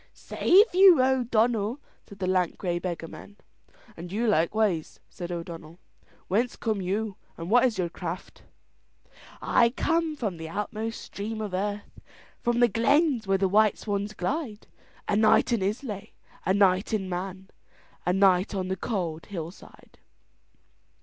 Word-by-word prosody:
"Save 400 +4 +3
you, 370 -4 +7
O'Donnell," 245 -2 +1 0.3
said 200 - -12
the 185 - -3
lank 185 -2 +1
grey 175 -2 -2
beggarman. 175 +3 -7 0.6
"And 175 +1 -9
you 220 +4 -1
likewise," 195 -3 +1
said 175 -1 -7
O'Donnell. 170 -1 -7 0.5
"Whence 230 +6 0
come 220 -4 -2
you, 200 +2 -2 0.2
and 170 +3 -6
what 245 +2 +6
is 235 -4 0
your 180 - 0
craft?" 170 - -7 1.0
"I 235 - +4
come 325 +5 0
from 210 - -3
the 160 0 -7
outmost 215 +4 -4
stream 215 +2 -6
of 210 -3 -4
earth, 205 +2 -4 0.4
From 240 0 +1
the 240 - +7
glens 250 - +2
where 195 0 +3
the 195 0 +2
white 210 +2 +3
swans 205 0 -3
glide, 225 - -3 0.4
A 205 - +1
night 215 +3 +4
in 230 - +1
Islay, 210 +1 -4 0.3
a 190 - +4
night 195 0 +3
in 195 -3 -3
Man, 185 +1 -5 0.5
A 180 - +1
night 190 +1 +3
on 185 -1 -2
the 190 - 0
cold 175 -6 -3
hillside." 170 -2 -10
205 Hz, 145 wpm, -27 LUFS, 185-230 Hz, 1.0 s, you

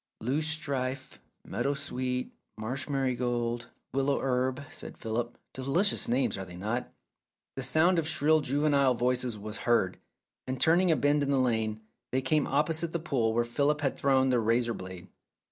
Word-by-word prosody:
"Loosestrife, 135 -1 -2 0.3
meadow 140 +1 -1
sweet, 125 -2 -3 0.2
marsh 125 +6 -4
marigold, 120 -3 -1 0.3
willow 135 +1 +1
herb," 130 +1 0
said - - -9
Philip. 115 +2 -3 0.2
"Delicious 140 +10 +1
names, 125 -4 +1
are 95 - -5
they 90 -1 -11
not? 110 +7 -3 0.3
" - - -63
The 135 - -3
sound 160 +7 +4
of 160 - -2
shrill 155 -1 +3
juvenile 140 -1 +2
voices 125 -1 0
was 105 +1 -5
heard, 95 -6 +2 0.5
and 130 0 -3
turning 175 +3 +4
a 160 - +5
bend 145 +2 +2
in 140 - 0
the 140 - +3
lane, 110 -4 0 0.3
they 130 - +2
came 150 +2 +2
opposite 160 +3 0
the - - +1
pool 130 -9 0
where 120 0 +2
Philip 145 +5 +1
had 135 -2 0
thrown 135 -1 +3
the 125 -1 +3
razor 115 +1 +2
blade. 95 -3 -8
130 Hz, 160 wpm, -29 LUFS, 120-145 Hz, 0.5 s, a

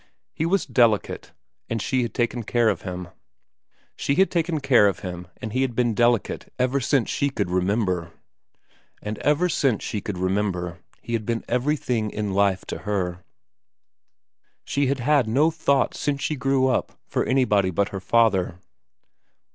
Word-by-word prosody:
He 160 - -1
was 195 +1 +1
delicate, 115 -5 +1 0.4
and 115 - -1
she 130 +4 0
had 120 - -2
taken 120 0 0
care 115 +1 +2
of 95 -5 -1
him. 90 -1 -6 0.9
She 140 - 0
had 190 +4 +3
taken 165 -2 0
care 125 -7 +5
of 100 - -2
him 90 -1 -6
and 110 -3 -6
he 130 - +1
had 130 -3 -1
been 120 -1 +2
delicate 120 0 +1
ever 130 +2 +1
since 135 -2 +1
she 140 - 0
could 90 -9 -2
remember. 90 -2 0 0.9
And 105 0 -4
ever 150 +5 +2
since 135 - +1
she 105 - -3
could 100 -2 -5
remember 90 -2 -1 0.2
he 120 - -5
had 115 -2 0
been 115 -1 -2
everything 125 -3 0
in 105 -2 -3
life 100 -1 +2
to - - -4
her. 90 -4 -2 1.4
She 140 -1 0
had 135 -1 -1
had 140 -2 +3
no 145 +9 +3
thought 140 -5 +1
since 145 -1 -2
she 155 - 0
grew 135 0 +1
up 130 - 0
for - - -1
anybody 105 -8 +2
but 100 +3 0
her 95 - -6
father. 95 -5 +2
115 Hz, 165 wpm, -24 LUFS, 100-135 Hz, 1.4 s, care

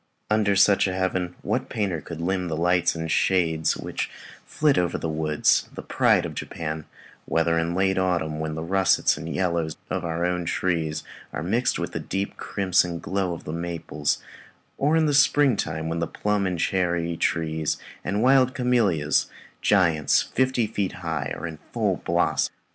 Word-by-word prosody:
Under 105 -2 +3
such 100 0 +5
a 95 - -2
heaven, 95 -1 -1
what - - -1
painter 95 -7 -1
could 80 +1 -8
limn 90 +1 -1
the 80 -2 -2
lights 90 +1 +2
and 80 -1 -3
shades 80 -4 +2
which - - -4 0.4
flit 150 -2 +2
over 90 -1 0
the - - -3
woods, 75 -1 +1
the - - -6
pride - - +3
of - - -5
Japan, 80 -1 -5 0.4
whether 80 +1 +1
in 85 +1 -1
late 95 0 +2
autumn, 85 -4 0
when 80 -1 -3
the 80 - -4
russets 95 +2 +3
and 80 - -6
yellows 85 -4 -1
of 95 - -1
our 85 0 -1
own 90 -1 -1
trees 80 -3 -1 0.3
are 75 - -4
mixed 115 +8 +1
with - - -3
the - - -3
deep 100 +1 -3
crimson 95 -3 0
glow 95 +1 -2
of 85 - -8
the 75 - -5
maples, 85 -3 -2 0.6
or 150 +4 +3
in 155 -2 +2
spring 145 -2 +4
time, 80 -3 -3
when 85 +1 -2
plum 105 +3 -1
and 90 -1 -2
cherry 85 -2 0
trees 80 -1 -1 0.3
and 100 +4 -1
wild 130 0 +4
camellias 105 - +2 0.3
giants, 85 -7 +3
fifty 130 -3 +1
feet 105 -3 -2
high 80 -4 -2
are - - -6
in 80 -2 -6
full - - +1
blossom? - - 0
90 Hz, 170 wpm, -25 LUFS, 80-100 Hz, 0.6 s, such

